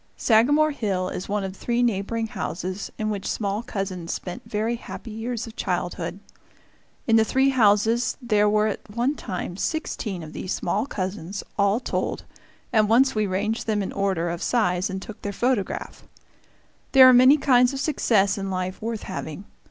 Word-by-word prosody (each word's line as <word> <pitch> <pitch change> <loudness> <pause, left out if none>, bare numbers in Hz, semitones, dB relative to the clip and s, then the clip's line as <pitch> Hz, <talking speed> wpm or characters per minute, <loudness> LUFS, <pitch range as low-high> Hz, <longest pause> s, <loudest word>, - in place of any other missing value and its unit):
Sagamore 290 +7 +4
Hill 195 -8 -1
is 185 - -6
one 205 0 0
of 190 0 -5
three 240 +4 0
neighboring 225 0 0
houses 185 -1 -4
in 215 0 -1
which 200 -2 -3
small 205 0 -1
cousins 190 -6 -4
spent 180 -1 -5
very 220 +3 -1
happy 230 0 -9
years 225 +1 -4
of 225 -1 -11
childhood. - - -3 0.9
In 225 -1 +4
the 220 - +5
three 265 +4 +2
houses 225 -1 +3
there 210 -5 +2
were 210 0 +3
at 215 0 -4
one 240 +6 0
time 185 -9 -5
sixteen 210 - -3
of 155 - -10
these 185 - -4
small 215 +6 -1
cousins, 190 -3 -4
all 200 +2 +2
told, - - -3 0.5
and 215 -2 +4
once 260 +4 +4
we 215 -1 0
ranged 205 +5 -2
them 210 -2 +1
in - - -4
order 190 -4 0
of 170 - -5
size 185 -5 +1
and 190 0 -4
took 220 - -10
their 205 - -3
photograph. 240 -1 -2 0.9
There 265 -1 +10
are 255 - +8
many 255 +4 +7
kinds 250 -3 +4
of 275 - -4
success 210 -9 +2
in 195 0 -3
life 185 0 -3
worth 225 -1 -4
having. 185 0 -6
210 Hz, 175 wpm, -24 LUFS, 195-240 Hz, 0.9 s, There